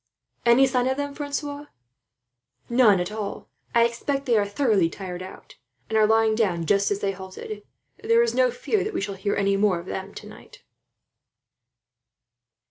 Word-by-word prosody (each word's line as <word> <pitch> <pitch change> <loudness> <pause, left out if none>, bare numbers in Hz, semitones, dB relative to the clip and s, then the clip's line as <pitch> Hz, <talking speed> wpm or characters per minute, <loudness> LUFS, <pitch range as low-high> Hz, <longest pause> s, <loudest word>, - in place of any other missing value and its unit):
"Any 240 +3 +6
sign 255 -1 +1
of 265 +1 0
them, 285 0 -3
Francois?" 290 0 -5 1.0
"None 230 -6 +5
at 180 +3 -3
all. 215 -2 -6 0.3
I 235 0 +6
expect 275 +4 -2
they 240 -4 +2
are 205 -2 +2
thoroughly 205 -6 +2
tired 180 0 -7
out, 185 +1 -11 0.3
and 220 - -2
are 215 -1 +5
lying 220 0 +3
down 185 -7 0
just 200 +4 +2
as 200 0 -2
they 200 - 0
halted. 190 +2 -8 0.4
There 460 +1 +4
is 470 - 0
no - - +3
fear 445 -4 -1
that 425 +1 -5
we - - -1
shall 200 0 -3
hear 200 +1 -2
any 200 0 +1
more 200 -3 +2
of 170 - -8
them, 190 +1 -6
tonight." - - -13
220 Hz, 170 wpm, -24 LUFS, 195-275 Hz, 1.0 s, Any